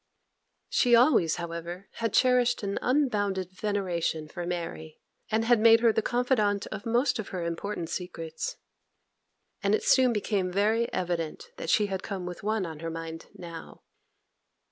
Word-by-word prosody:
She 245 -2 +4
always, 230 - +4
however, 170 +2 -6
had 230 -1 -1
cherished 250 -2 +3
an 200 0 -2
unbounded 205 - +1
veneration 180 -6 -2
for 175 +2 -6
Mary, 165 -3 -5 0.3
and 225 +1 +1
had 240 -1 +4
made 225 +1 +7
her 230 -2 +5
the 220 - +1
confidante 220 -5 +1
of 215 +1 -6
most 240 +2 +2
of 215 - -4
her 180 -3 -4
important 170 +1 -3
secrets; 175 - -5 1.0
and 200 +1 +3
it - - -3
soon 260 -2 +5
became 200 -4 -1
very 215 +5 +1
evident 170 -3 -3
that - - -5
she 210 - +4
had 190 -2 -3
come 195 -4 -5
with 180 0 -6
one 215 -1 0
on 160 -2 -7
her 165 +1 -4
mind 165 0 -7
now. 170 -2 -10
200 Hz, 155 wpm, -28 LUFS, 170-225 Hz, 1.0 s, made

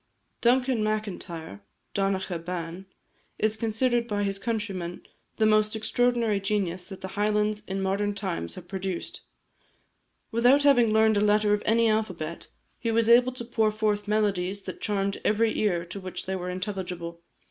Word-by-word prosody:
Duncan 250 -1 +3
Macintyre 180 - -4 0.3
(Donacha 190 -3 -1
Ban) 175 +2 -5 0.5
is 215 0 +1
considered 235 +2 +1
by 205 -2 -1
his 195 -1 -1
countrymen 195 -6 -3 0.3
the 220 - +2
most 215 0 +3
extraordinary 230 -1 +1
genius 195 -3 -1
that 190 -2 -10
the 190 - -5
Highlands 210 +1 0
in 195 0 -2
modern 200 +2 0
times 185 - -3
have 180 -1 -10
produced. 190 -1 -4 1.1
Without 245 +5 +4
having 245 -6 +5
learned 220 0 +4
a - - +3
letter 210 0 +3
of 210 - +1
any 230 +1 +4
alphabet, 185 -7 -2 0.3
he 230 - -2
was 225 0 +2
enabled 245 +2 +5
to 240 - -5
pour 225 -2 +1
forth 210 -1 0
melodies 200 -2 0
that - - -7
charmed 200 -2 -1
every 220 +1 +2
ear 180 -5 +1
to 185 +3 -7
which 185 -1 -6
they 190 +1 -2
were 180 -1 -4
intelligible. 180 -3 -5
210 Hz, 155 wpm, -27 LUFS, 190-220 Hz, 1.1 s, having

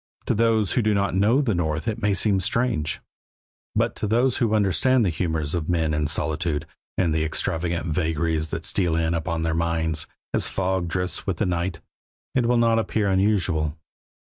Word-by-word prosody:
To - - +1
those 110 -2 +2
who 125 - +2
do 105 -1 +2
not 100 0 0
know 105 +9 +3
the 120 -7 0
North 80 -3 -1
it 110 - -2
may 100 -1 +2
seem 100 0 +3
strange, 100 -5 0 0.7
but - - +1
to - - -2
those 120 +4 +2
who 115 -5 +1
understand 110 +5 +3
the 90 - +1
humors 80 -3 -2
of 85 -2 -2
men 80 -3 +1
in 75 -1 0
solitude, 75 +1 -1 0.3
and 85 -4 +2
the 80 0 +1
extravagant 85 +2 -1
vagaries 80 -1 0
that - - -4
steal 90 -5 +1
in 80 0 +1
upon 85 -1 -2
their 80 0 0
minds, 80 -1 0 0.3
as - - +2
fog 95 -2 -1
drifts 90 +3 -3
with 95 -4 -1
the 105 - 0
night, 85 -1 -2 0.5
it 125 -3 +2
will 120 0 +3
not 115 -1 +3
appear 105 -1 0
unusual. 90 -6 +1
90 Hz, 185 wpm, -24 LUFS, 80-105 Hz, 0.7 s, know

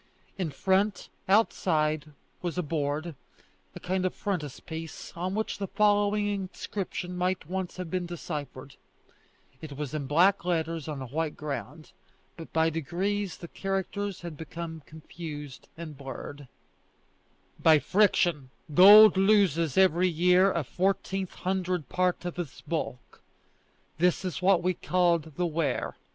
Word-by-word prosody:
In 185 -5 -2
front, 190 +7 0 0.2
outside, 155 -7 +2 0.3
was 175 -1 -3
a 180 - 0
board, 150 +1 -2 0.6
a - - -7
kind 185 +1 -1
of 185 - -1
frontispiece, 160 -3 -5
on 180 +3 -3
which 220 -1 -2
the 195 - -2
following 205 +1 +2
inscription 190 -2 -4
might 180 -1 -1
once 185 0 -4
have 180 -3 -6
been 180 -1 -2
deciphered; 145 -6 -7 0.8
it 145 -3 -8
was 150 -2 -4
in 145 -3 -3
black 180 +8 +4
letters 165 -3 -1
on 145 -4 -4
a - - -6
white 150 +4 -3
ground, 145 +1 -6 0.4
but 165 -4 -10
by 160 0 +2
degrees 185 +5 -2
the 170 - -9
characters 195 +1 -3
had 170 -2 -7
become 160 0 -7
confused 155 -3 -9
and 155 -4 -8
blurred: 140 +1 -8 1.1
"By 160 -1 +6
friction 175 -6 +2 0.2
gold 205 +3 +9
loses 190 -7 +3
every 185 -1 +4
year 180 +3 +4
a 170 - -1
fourteen 190 +4 -1
hundredth 185 -3 -2
part 180 -1 0
of 175 0 -4
its 160 -7 -6
bulk. 155 -6 -5 0.8
This 180 +2 +2
is 185 - -3
what 180 -2 +3
is 185 -1 +2
called 170 -4 +1
the 180 - 0
Wear. 155 -5 -1
175 Hz, 135 wpm, -28 LUFS, 155-190 Hz, 1.1 s, gold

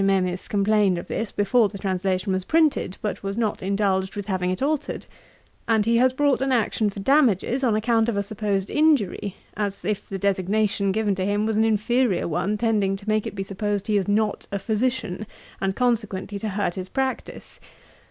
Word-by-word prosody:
Memis 185 -2 +1
complained 205 -2 +2
of 170 - -5
this 225 -2 -3
before 205 +2 +3
the 200 - -8
translation 190 0 -1
was 185 0 -1
printed, 310 - +1
but 210 - -2
was 195 +1 -4
not 220 -3 -1
indulged 190 -1 0
with 205 -1 -4
having 185 -3 -1
it 185 - -2
altered; 295 +1 -1 0.6
and 220 -2 +3
he 230 +1 +3
has 255 +2 +4
brought 280 0 +1
an 270 0 +1
action 225 -3 +1
for 200 - -8
damages, 260 0 +2
on 230 -4 +3
account 225 +1 +2
of 215 - -1
a 200 - +1
supposed 200 -1 -2
injury, 260 - +2 0.2
as 200 -3 -3
if 210 0 -2
the 195 - -3
designation 200 +1 +1
given 210 0 +1
to 185 -1 -2
him 205 +2 0
was 220 -1 0
an 220 - +3
inferiour 225 0 +1
one, 195 +6 -1
tending 210 -4 +1
to 200 +2 -12
make 215 -1 +1
it - - -7
be 195 - -3
supposed 205 +1 -2
he 215 - 0
is 200 -1 +1
not 210 +1 0
a 200 - -1
Physician, 215 -2 -2 0.3
and, 195 0 0
consequently, 210 -5 -1
to 215 - -3
hurt 200 -2 -1
his 185 0 -6
practice. 265 -1 -4
205 Hz, 195 wpm, -24 LUFS, 195-225 Hz, 0.6 s, has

